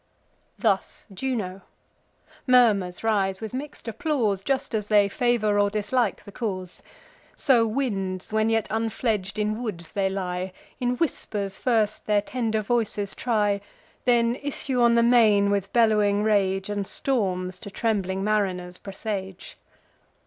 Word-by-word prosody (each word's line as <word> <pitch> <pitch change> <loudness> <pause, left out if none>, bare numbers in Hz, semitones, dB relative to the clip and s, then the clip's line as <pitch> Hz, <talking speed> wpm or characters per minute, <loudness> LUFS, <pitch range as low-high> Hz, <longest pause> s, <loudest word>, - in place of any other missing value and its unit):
Thus 200 -5 0
Juno. 195 -5 -3 0.9
Murmurs 215 -8 +4
rise, 195 -4 +1
with 220 +1 -6
mix'd 275 -1 -7
applause, 230 - 0
Just 265 +4 -1
as 210 -2 -1
they 205 -2 +5
favour 215 -1 +1
or 205 0 +3
dislike 215 +4 0
the 205 - -11
cause. 185 -5 -4 0.5
So 240 -5 +3
winds, 200 -6 -2
when 220 0 +2
yet 225 -1 +1
unfledg'd 220 -3 -1
in 215 +2 -1
woods 180 -8 -5
they 195 -1 0
lie, 185 -1 -3 0.3
In 245 0 0
whispers 210 - -2
first 220 -4 0
their 205 -1 +3
tender 220 -2 -1
voices 210 -3 -1
try, 210 -4 0 0.4
Then 240 -1 +3
issue 275 -3 -2
on 235 0 +5
the 235 - +4
main 215 -4 +5
with 200 -1 -1
bellowing 210 -3 +3
rage, 195 -3 +1
And 205 -2 -3
storms 185 -8 -1
to 200 - -8
trembling 195 -3 -1
mariners 185 -4 -1
presage. 195 -2 -6
210 Hz, 135 wpm, -25 LUFS, 195-235 Hz, 0.9 s, they